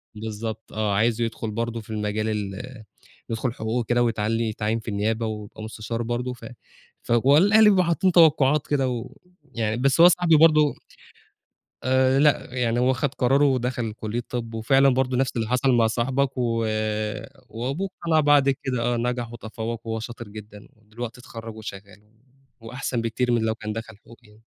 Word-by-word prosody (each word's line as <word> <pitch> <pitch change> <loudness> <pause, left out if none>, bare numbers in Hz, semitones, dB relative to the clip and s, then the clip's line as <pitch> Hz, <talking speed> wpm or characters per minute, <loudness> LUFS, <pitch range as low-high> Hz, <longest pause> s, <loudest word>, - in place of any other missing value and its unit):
بالضبط 110 +1 -6
آه، 105 -2 -1
عايزُه 115 +2 +1
يدخل 115 -1 -5
برضه 115 +1 -3
في 110 - -18
المجال 110 0 -2
ال 110 +3 -5 0.5
يدخل 115 +2 -2
حقوق 110 +2 -2
وكده 120 0 +1
ويتعيّن- 115 +1 -1
يتعيّن 110 +1 -2
في 110 - -16
النيابة 110 +2 -1
ويبقى 110 0 -6
مستشار 110 +1 -5
برضه، 120 +2 -3
ف 125 - -12 0.6
فهو 130 +5 +4
الأهل 205 +5 +6
بيبقوا 190 -2 +4
حاطّين 175 +3 +2
توقعات 150 -4 +4
كده 135 -3 +1 0.7
ويعني 110 -1 -1
بس 135 +5 +2
هو 175 - +10
صاحبي 175 -2 +4
برضه 155 -2 +5 1.1
آآ، 130 +1 +3
لأ 145 -4 +2
يعني 120 -2 0
هو 130 +1 +3
خد 135 +1 -2
قرارُه 135 +3 +3
ودخل 125 -4 -1
كُلية 110 +2 -4
طِب 115 -2 -4
وفعلًا 135 +5 +3
برضه 130 -1 0
نفس 135 -1 0
اللي 115 -2 -1
حصل 125 +3 +2
مع 115 -2 +4
صاحبك، 130 +4 -1
و - - 0 1.1
وأبوه 135 +12 -3 0.2
اقتنع 160 -2 +3
بعد 145 -2 +4
كده، 130 -2 -2
آه، 120 0 0
نجح 120 0 -2
وتفوّق 115 0 -6
وهو 110 0 -2
شاطر 120 0 -8
جدًا 105 0 -11
ودلوقتي 115 +2 -8
اتخرّج 115 -2 -9
وشغّال، 100 -1 -10 0.6
وأحسن 120 +1 -4
بكتير 120 +2 -1
من 120 -1 +2
لو 110 0 0
كان 105 -1 -5
دخل 110 -1 -7
حقوق 115 +2 -17
يعني، 105 0 -21
120 Hz, 165 wpm, -24 LUFS, 110-130 Hz, 1.1 s, هو